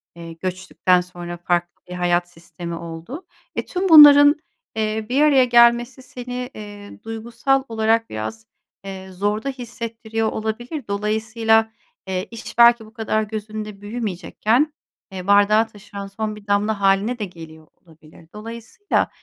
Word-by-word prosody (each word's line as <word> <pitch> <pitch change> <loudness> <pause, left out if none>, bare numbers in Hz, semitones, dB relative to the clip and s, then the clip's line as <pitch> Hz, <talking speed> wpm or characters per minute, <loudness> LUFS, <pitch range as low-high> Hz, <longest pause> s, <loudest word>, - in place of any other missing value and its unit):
eee, 165 -1 -9
göçtükten 185 +1 0
sonra 175 -1 -8
farklı 175 0 -2
bir 180 - -7
hayat 175 0 0
sistemi 170 0 -8
oldu. 170 - -8 0.3
E, - - -2
tüm 370 +1 -2
bunların, 290 -2 +9 0.4
eee, 220 0 -1
bir 275 +4 +2
araya 275 -4 +5
gelmesi 240 +2 +4
seni, 250 -1 -6
eee, 205 0 -11
duygusal 235 +4 -1
olarak 225 0 +1
biraz, 110 0 -6 0.4
eee, 190 -1 -8
zorda 205 +7 -2
hissettiriyor 230 -3 -4
olabilir. 235 +5 -5
Dolayısıyla, 220 +2 +1 0.4
eee, 185 +1 -3
iş, 230 0 -9
belki 235 -1 +6
bu 215 - -17
kadar 220 -1 -1
gözünde 215 -1 -6
büyümeyecekken, 225 - -1 0.4
eee, 185 -1 -7
bardağı 205 +2 +4
taşıran 200 -2 -10
son 215 +1 -4
bir 210 -1 -15
damla 205 +1 0
hâline 200 +5 +2
de 210 - -2
geliyor 160 -3 -13
olabilir. 160 -1 -20
Dolayısıyla, 230 - -3
215 Hz, 135 wpm, -21 LUFS, 185-235 Hz, 0.4 s, bunların